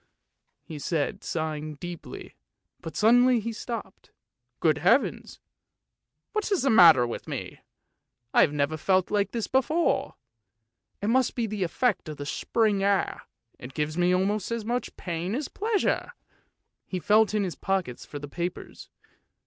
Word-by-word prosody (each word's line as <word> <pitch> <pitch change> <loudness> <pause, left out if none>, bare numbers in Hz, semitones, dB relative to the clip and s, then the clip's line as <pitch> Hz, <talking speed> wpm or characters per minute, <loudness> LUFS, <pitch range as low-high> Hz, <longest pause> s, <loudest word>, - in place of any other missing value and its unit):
he 155 -2 -8
said, 150 0 -2
sigh 155 -2 -2
ing 150 0 -6
deeply; 175 +2 -8 0.5
but 160 -3 -8
suddenly 245 +4 +5
he 225 +1 -4
stopped. 230 +1 -7 0.3
" - - -55
Good - - +2
Heavens! - - +1 0.9
what 425 -1 -1
is 390 - +2
the 270 - +3
matter 165 - +8
with 120 - -6
me? - - -6 0.7
I - - +6
have - - +4
never 145 +1 -1
felt 185 +3 +1
like 205 -1 +1
this 230 -3 -3
before! 300 +6 +1 0.9
It 205 - +1
must 255 +1 +2
be 235 - 0
the 210 -2 -4
effect 200 0 0
of 150 - -7
the 145 - -6
spring 210 +6 0
air, 200 -1 0 0.3
it 125 +2 -10
gives 150 0 -2
me 175 +1 +2
almost 195 +2 0
as 230 -2 -3
much 245 +2 -3
pain 175 +3 -3
as 285 +2 -3
pleasure! 435 +2 -1 0.4
" - - -54
He 185 - -3
felt 215 +4 +3
in 210 - +2
his 180 -3 -3
pockets 190 -10 -2
for 145 - -8
the 145 0 -7
papers. 175 +4 -6
195 Hz, 160 wpm, -27 LUFS, 160-230 Hz, 0.9 s, matter